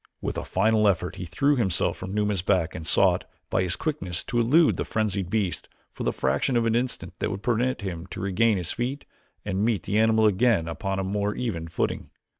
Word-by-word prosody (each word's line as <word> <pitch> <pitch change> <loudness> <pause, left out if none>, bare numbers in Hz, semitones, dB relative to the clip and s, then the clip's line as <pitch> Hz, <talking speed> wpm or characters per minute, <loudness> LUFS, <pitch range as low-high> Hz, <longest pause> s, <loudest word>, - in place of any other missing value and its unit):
With - - -3
a - - -3
final 110 +2 +2
effort 95 -1 0
he 90 - -5
threw 140 - +2
himself 100 -8 +2
from 95 - -7
Numa's 105 -2 0
back 90 -3 +1
and 80 - -6
sought, - - +4 0.3
by - - +2
his 90 -2 +1
quickness, 95 - -3
to 120 - -1
elude 150 +8 +4
the - - -1
frenzied 100 -4 -1
beast 100 -3 -2 0.2
for - - -10
the - - +1
fraction 70 - 0
of 115 - +1
an 115 - +2
instant 125 +2 -2
that - - -1
would 100 +1 -5
permit 125 +2 0
him 90 -3 -5
to - - -8
regain 100 +3 +2
his 90 -2 -3
feet 130 +4 -3 0.4
and 100 -1 -1
meet 110 -6 +1
the 105 +2 0
animal 110 0 +4
again 105 -4 +3
upon 95 +3 -3
a 95 - -1
more 100 +2 -1
even 90 -10 -3
footing. 80 - -2
105 Hz, 215 wpm, -26 LUFS, 95-115 Hz, 0.4 s, sought